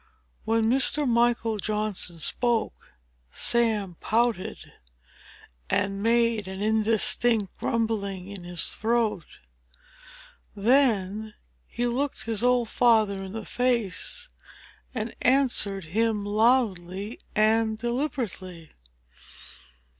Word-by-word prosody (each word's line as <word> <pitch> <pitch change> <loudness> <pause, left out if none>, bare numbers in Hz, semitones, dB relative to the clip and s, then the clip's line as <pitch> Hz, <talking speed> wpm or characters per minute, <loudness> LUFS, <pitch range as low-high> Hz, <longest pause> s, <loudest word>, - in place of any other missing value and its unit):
When 225 0 +1
Mr. 270 +4 +3
Michael 235 -2 +1
Johnson 210 -4 -1
spoke, 235 +8 -1 0.4
Sam 215 - +1
pouted, 230 -3 -1 1.0
and 195 +1 -1
made 230 -2 +1
an 190 0 -6
indistinct 220 0 +2
grumbling 200 -5 -2
in 200 -2 -7
his 175 -1 0
throat; 220 -5 -1 1.3
then 215 -3 +1 0.3
he 240 - -3
looked 260 +4 -2
his 225 -2 -2
old 245 -2 +2
father 215 -5 +2
in 190 0 -8
the 225 -1 -6
face, 245 - -1 0.7
and 220 -1 -3
answered 240 -7 +2
him 210 +5 -1
loudly 205 -3 0 0.2
and 220 0 +2
deliberately. 230 - -4
220 Hz, 90 wpm, -26 LUFS, 200-235 Hz, 1.3 s, Mr